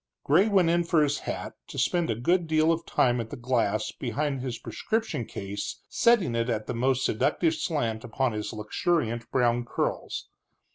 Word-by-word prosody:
Gray 175 Hz, +9 st, +4 dB
went 190 Hz, -5 st, +4 dB
in 170 Hz, 0 st, +3 dB
for 170 Hz, -2 st, +3 dB
his 145 Hz, -1 st, 0 dB
hat, -, -, -4 dB
to -, -, -9 dB
spend 175 Hz, -2 st, +1 dB
a 115 Hz, -, +1 dB
good 170 Hz, -, +1 dB
deal 155 Hz, +1 st, +3 dB
of 165 Hz, 0 st, -2 dB
time 120 Hz, -1 st, +2 dB
at 115 Hz, -, -7 dB
the -, -, -6 dB
glass 115 Hz, -4 st, 0 dB
behind 140 Hz, +2 st, -2 dB
his 125 Hz, -2 st, -3 dB
prescription 220 Hz, -, -2 dB
case 100 Hz, +1 st, -5 dB
setting 235 Hz, -, +3 dB
it 115 Hz, +1 st, 0 dB
at 110 Hz, -2 st, -1 dB
the -, -, -3 dB
most 130 Hz, +2 st, +1 dB
seductive 160 Hz, +9 st, +1 dB
slant 115 Hz, -11 st, -2 dB
upon 125 Hz, +2 st, 0 dB
his 105 Hz, -1 st, -4 dB
luxuriant 115 Hz, +2 st, -1 dB
brown 120 Hz, -2 st, +2 dB
curls. 120 Hz, -, -3 dB
130 Hz, 180 wpm, -27 LUFS, 115-165 Hz, -, Gray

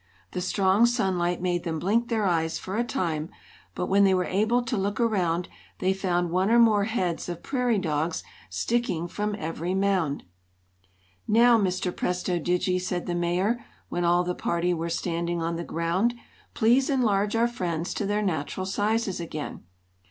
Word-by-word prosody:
The 180 Hz, -, -3 dB
strong 195 Hz, +4 st, +3 dB
sunlight 185 Hz, -7 st, 0 dB
made 175 Hz, -1 st, 0 dB
them 165 Hz, -1 st, -2 dB
blink 215 Hz, +8 st, +1 dB
their 220 Hz, -3 st, +1 dB
eyes 165 Hz, -3 st, +1 dB
for 190 Hz, -, -5 dB
a 235 Hz, -, +2 dB
time, 165 Hz, -8 st, -2 dB, 0.5 s
but -, -, -1 dB
when 200 Hz, +2 st, +4 dB
they 190 Hz, -1 st, +5 dB
were 180 Hz, -1 st, +1 dB
able 220 Hz, +6 st, +1 dB
to 250 Hz, 0 st, -2 dB
look 200 Hz, 0 st, -1 dB
around 180 Hz, -7 st, +1 dB, 0.3 s
they 185 Hz, +1 st, +1 dB
found 175 Hz, -3 st, 0 dB
one 185 Hz, +3 st, +2 dB
or 235 Hz, -, +5 dB
more 215 Hz, -4 st, +5 dB
heads 185 Hz, -7 st, -2 dB
of 175 Hz, -1 st, -6 dB
prairie 250 Hz, -4 st, +1 dB
dogs 160 Hz, -2 st, -1 dB, 0.3 s
sticking 175 Hz, -, -1 dB
from 210 Hz, +3 st, -2 dB
every 165 Hz, +1 st, -3 dB
mound. 190 Hz, -7 st, +1 dB, 1.0 s
"Now, 235 Hz, +2 st, +6 dB
Mr. 185 Hz, -2 st, -1 dB
Presto 180 Hz, 0 st, -1 dB
Digi," 180 Hz, +2 st, 0 dB
said 180 Hz, -1 st, -3 dB
the 175 Hz, -, -2 dB
Mayor, 180 Hz, +7 st, 0 dB, 0.3 s
when 175 Hz, -, -1 dB
all 175 Hz, +1 st, +3 dB
the 180 Hz, 0 st, -1 dB
party 175 Hz, 0 st, 0 dB
were 165 Hz, 0 st, -2 dB
standing 170 Hz, 0 st, -2 dB
on 165 Hz, +1 st, -1 dB
the 170 Hz, -, -3 dB
ground, 170 Hz, +9 st, 0 dB, 0.4 s
"please 245 Hz, +5 st, +3 dB
enlarge 210 Hz, -6 st, +2 dB
our 230 Hz, +1 st, +3 dB
friends 175 Hz, -7 st, -3 dB
to 205 Hz, -, -2 dB
their 210 Hz, +1 st, 0 dB
natural 180 Hz, 0 st, -2 dB
sizes 205 Hz, 0 st, 0 dB
again." 155 Hz, -3 st, -6 dB
185 Hz, 170 wpm, -26 LUFS, 170-210 Hz, 1.0 s, Now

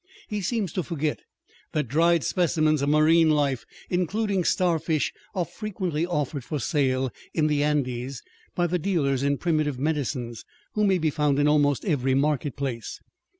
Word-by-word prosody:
He 210 Hz, -1 st, -2 dB
seems 200 Hz, -3 st, -1 dB
to 185 Hz, -, 0 dB
forget 155 Hz, -3 st, -2 dB, 0.5 s
that 150 Hz, -4 st, 0 dB
dried 165 Hz, +4 st, +3 dB
specimens 155 Hz, -4 st, +2 dB
of 140 Hz, -, +1 dB
marine 155 Hz, +2 st, +5 dB
life, 140 Hz, -5 st, +1 dB, 0.2 s
including 190 Hz, +2 st, 0 dB
starfish, 165 Hz, -4 st, +1 dB, 0.2 s
are 180 Hz, -2 st, 0 dB
frequently 180 Hz, -5 st, -3 dB
offered 150 Hz, -5 st, -2 dB
for 150 Hz, +4 st, -3 dB
sale 130 Hz, -2 st, 0 dB, 0.2 s
in 155 Hz, -, +2 dB
the 150 Hz, -1 st, +2 dB
Andes 130 Hz, -4 st, -1 dB, 0.3 s
by 175 Hz, -, +2 dB
the 175 Hz, +1 st, 0 dB
dealers 150 Hz, -8 st, 0 dB
in 140 Hz, 0 st, +1 dB
primitive 155 Hz, -5 st, 0 dB
medicines 130 Hz, -5 st, -2 dB, 0.3 s
who 210 Hz, 0 st, +2 dB
may 190 Hz, -1 st, +3 dB
be 160 Hz, -3 st, +1 dB
found 150 Hz, -2 st, +1 dB
in 145 Hz, 0 st, +3 dB
almost 145 Hz, -2 st, +2 dB
every 135 Hz, -7 st, +1 dB
market 145 Hz, -1 st, 0 dB
place. 125 Hz, -6 st, -4 dB
150 Hz, 155 wpm, -25 LUFS, 140-170 Hz, 0.5 s, marine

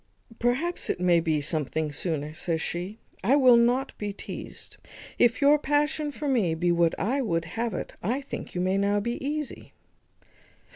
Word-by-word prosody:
"Perhaps 265 Hz, +9 st, 0 dB
it -, -, -1 dB
may 175 Hz, -1 st, +4 dB
be 160 Hz, -3 st, 0 dB
something 155 Hz, 0 st, -2 dB
sooner," 155 Hz, -2 st, -3 dB
says 165 Hz, 0 st, -2 dB
she; 180 Hz, +6 st, -4 dB, 0.3 s
"I 245 Hz, +8 st, +4 dB
will 255 Hz, -4 st, +7 dB
not 245 Hz, +3 st, +2 dB
be 205 Hz, -1 st, -2 dB
teazed. 200 Hz, -, -9 dB, 0.4 s
If 240 Hz, +3 st, +3 dB
your 295 Hz, +1 st, +6 dB
passion 295 Hz, +1 st, 0 dB
for 295 Hz, +1 st, -5 dB
me 215 Hz, -12 st, +2 dB
be 175 Hz, +2 st, +1 dB
what 170 Hz, -1 st, +2 dB
I 260 Hz, +7 st, 0 dB
would 165 Hz, -9 st, -1 dB
have 225 Hz, +4 st, -3 dB
it, -, -, -5 dB
I 240 Hz, +9 st, 0 dB
think 275 Hz, -, -7 dB
you 180 Hz, -, 0 dB
may 185 Hz, +2 st, +1 dB
now 200 Hz, +1 st, +2 dB
be 235 Hz, +5 st, -3 dB
easy." 300 Hz, +1 st, -4 dB
205 Hz, 175 wpm, -27 LUFS, 170-270 Hz, 0.4 s, will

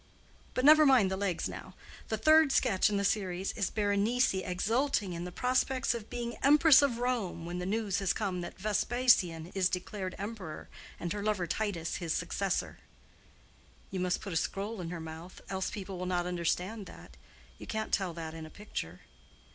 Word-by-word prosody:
But 255 Hz, -, +1 dB
never 310 Hz, +1 st, +9 dB
mind 255 Hz, -9 st, +5 dB
the -, -, 0 dB
legs 190 Hz, -3 st, -1 dB
now: -, -, -9 dB, 0.3 s
the 220 Hz, -, -1 dB
third 310 Hz, +4 st, +5 dB
sketch 195 Hz, -6 st, +3 dB
in 205 Hz, -, 0 dB
the 200 Hz, -, 0 dB
series 190 Hz, -2 st, 0 dB
is 200 Hz, -4 st, -1 dB
Berenice 210 Hz, +4 st, +2 dB
exulting 200 Hz, +3 st, 0 dB
in 170 Hz, +1 st, -5 dB
the 180 Hz, -, -6 dB
prospects 255 Hz, +4 st, +1 dB
of 230 Hz, -2 st, -7 dB
being 240 Hz, -1 st, -4 dB
Empress 295 Hz, 0 st, +7 dB
of 275 Hz, -5 st, +1 dB
Rome, 235 Hz, -9 st, -2 dB
when 175 Hz, +1 st, -4 dB
the 180 Hz, -, -3 dB
news 205 Hz, -2 st, 0 dB
has 195 Hz, -2 st, +1 dB
come 190 Hz, -4 st, -2 dB
that 175 Hz, -, -7 dB
Vespasian 200 Hz, -5 st, +2 dB
is 190 Hz, -2 st, +2 dB
declared 185 Hz, +1 st, -4 dB
Emperor 200 Hz, -6 st, -6 dB, 0.3 s
and 170 Hz, -1 st, -3 dB
her 205 Hz, -, -4 dB
lover 205 Hz, -3 st, 0 dB
Titus 175 Hz, -4 st, -2 dB
his 170 Hz, -3 st, -2 dB
successor." 185 Hz, +3 st, -2 dB, 1.1 s
"You 190 Hz, -, -3 dB
must 180 Hz, 0 st, 0 dB
put 195 Hz, -, -5 dB
a -, -, +1 dB
scroll 200 Hz, +4 st, -2 dB
in 165 Hz, -, -5 dB
her 175 Hz, -1 st, -5 dB
mouth, 160 Hz, +3 st, -9 dB
else 190 Hz, -1 st, -1 dB
people 195 Hz, -2 st, -6 dB
will 180 Hz, -, -3 dB
not 175 Hz, -1 st, 0 dB
understand 180 Hz, +4 st, -2 dB
that. -, -, -13 dB, 0.4 s
You -, -, -9 dB
can't 220 Hz, 0 st, -3 dB
tell 190 Hz, -3 st, +1 dB
that 160 Hz, -1 st, -6 dB
in 160 Hz, -1 st, -7 dB
a -, -, -12 dB
picture." 90 Hz, -, -7 dB
195 Hz, 185 wpm, -31 LUFS, 180-225 Hz, 1.1 s, never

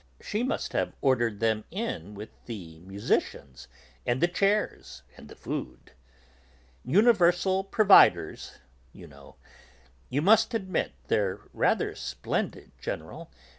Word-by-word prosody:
She 210 Hz, -, -3 dB
must 255 Hz, -, -2 dB
have -, -, -1 dB
ordered 120 Hz, -6 st, +1 dB
them 110 Hz, -1 st, 0 dB
in 135 Hz, -, -5 dB
with 105 Hz, +2 st, -9 dB, 0.2 s
the 85 Hz, -9 st, -8 dB
musicians 90 Hz, -7 st, -3 dB, 0.4 s
and 120 Hz, +2 st, 0 dB
the 175 Hz, -, +3 dB
chairs 195 Hz, -, -1 dB
and -, -, -14 dB
the -, -, -12 dB
food. 65 Hz, -, -7 dB, 0.9 s
'Universal 190 Hz, -, +3 dB
providers,' 200 Hz, 0 st, +4 dB, 0.4 s
you 90 Hz, -, -12 dB
know. 70 Hz, -4 st, -16 dB, 0.7 s
You 145 Hz, +4 st, -1 dB
must 220 Hz, +4 st, +4 dB
admit, 190 Hz, -4 st, -2 dB
they're 100 Hz, -1 st, 0 dB
rather -, -, +1 dB
splendid, -, -, -4 dB
General. -, -, -6 dB
130 Hz, 115 wpm, -27 LUFS, -, 0.9 s, providers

